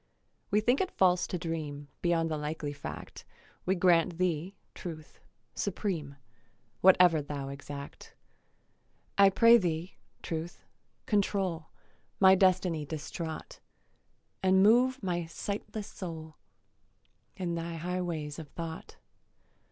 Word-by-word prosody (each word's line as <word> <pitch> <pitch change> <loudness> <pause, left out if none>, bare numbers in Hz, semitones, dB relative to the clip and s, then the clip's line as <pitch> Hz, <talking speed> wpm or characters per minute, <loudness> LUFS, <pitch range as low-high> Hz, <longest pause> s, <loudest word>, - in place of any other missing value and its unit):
We 210 +1 +3
think 245 - +3
it 375 - 0
false 180 -1 +3
to 180 - -3
dream 155 -3 -4
Beyond 165 -2 +1
the - - 0
likely 150 -1 -4
fact; 145 - -8 0.4
We 190 - +3
grant 175 -2 +3
thee, 180 +1 -1 0.2
Truth, 155 -3 -9 0.3
supreme, 175 -8 -3 0.7
Whatever 180 -4 +6
thou 140 -1 -5
exact. 140 0 -9 1.0
I 200 -1 +8
pray 230 +4 +7
thee, 175 -3 -2 0.3
Truth, 165 +1 -5 0.4
control 195 -5 0 0.5
My 190 -1 +8
destiny 185 -4 +3
distraught, 160 +2 -6 0.8
And 190 0 +4
move 250 +4 +4
my 175 -3 -1
sightless 205 +4 -5
soul 160 -5 -8 1.0
In 180 -3 -2
thy 170 0 -4
high 180 +3 -2
ways 155 -4 -4
of 160 - -8
thought. 165 -1 -7
170 Hz, 115 wpm, -30 LUFS, 160-190 Hz, 1.0 s, I